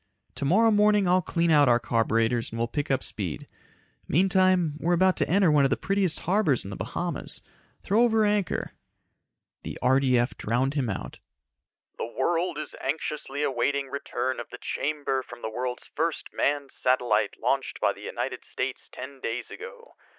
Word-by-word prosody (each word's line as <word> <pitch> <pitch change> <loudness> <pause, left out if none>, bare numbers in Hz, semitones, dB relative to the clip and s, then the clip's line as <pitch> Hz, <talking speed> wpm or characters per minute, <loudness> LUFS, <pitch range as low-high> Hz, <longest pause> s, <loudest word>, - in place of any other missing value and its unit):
Tomorrow 205 +11 +3
morning 210 -2 +4
I'll 180 +1 +4
clean 170 -1 0
out 145 -4 +6
our 120 0 +5
carburetors 115 0 +1
and 115 - -7
we'll 115 0 0
pick 145 +5 -3
up 135 -2 +1
speed. 95 -7 -3 0.6
Meantime, 185 -1 +3
we're 175 +2 +2
about 185 +1 +4
to - - +1
enter 185 -1 +4
one 145 -2 +5
of 135 - +3
the - - +1
prettiest 195 -4 +1
harbors 180 - +2
in 95 - -7
the - - -5
Bahamas, 135 - -3 0.4
throw 210 +4 +3
over 225 -2 +4
anchor 205 -4 0 0.5
..." - - -59
The - - -6
RDF 130 -1 +3
drowned 125 +5 0
him 135 -6 -1
out. 95 - -5 0.8
"The 115 - -4
world 170 +4 0
is 155 - -6
anxiously 145 0 -3
awaiting 140 +1 0
return 130 -2 -2
of 120 - -7
the - - -9
chamber 145 -3 -2
from 120 -1 -12
the 110 - -3
world's 125 +2 -4
first 160 +1 -1
manned 140 -1 0
satellite 120 -5 +1
launched - - -1
by - - +2
the - - -14
United - - -4
States - - -5
ten 135 +1 -9
days 120 0 -4
ago. 475 +2 -10
140 Hz, 170 wpm, -27 LUFS, 125-180 Hz, 0.8 s, out